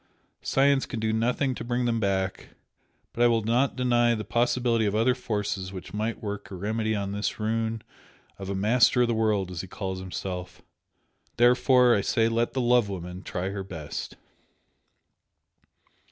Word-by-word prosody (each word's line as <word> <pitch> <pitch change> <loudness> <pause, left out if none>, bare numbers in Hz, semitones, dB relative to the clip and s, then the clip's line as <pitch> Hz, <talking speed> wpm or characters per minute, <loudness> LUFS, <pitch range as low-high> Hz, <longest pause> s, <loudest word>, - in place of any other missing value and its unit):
Science 140 0 +2
can 115 - -4
do 110 0 0
nothing 125 +4 +1
to - - -6
bring 120 +1 -1
them 115 -1 +1
back, 95 -2 -2 0.6
but 120 - -3
I 120 - +7
will 115 -2 +2
not 120 +5 +1
deny 120 -2 +2
the 110 - -4
possibility 120 -2 +1
of 100 - -1
other 115 +4 +3
forces 105 -6 -3
which 95 -2 -9
might 110 +2 -3
work 100 -1 -5
a 95 - -7
remedy 110 +3 -1
on 100 -1 -3
this 105 +2 -3
ruin 110 0 -1 0.6
of 95 -1 -6
a 100 - -2
'master 120 +5 +4
of - - +2
the 120 - 0
world' 105 -4 0
as 90 -1 -4
he 95 - -9
calls 95 0 -5
himself! 95 -1 -6 0.7
Therefore 125 +1 +5
I 100 - +2
say 115 +2 +2
let 115 +1 0
the 130 - 0
love 120 -3 +3
woman 90 -1 -6
try 95 0 -4
her 100 0 -4
best!" 80 -6 -6
110 Hz, 170 wpm, -26 LUFS, 100-120 Hz, 0.7 s, I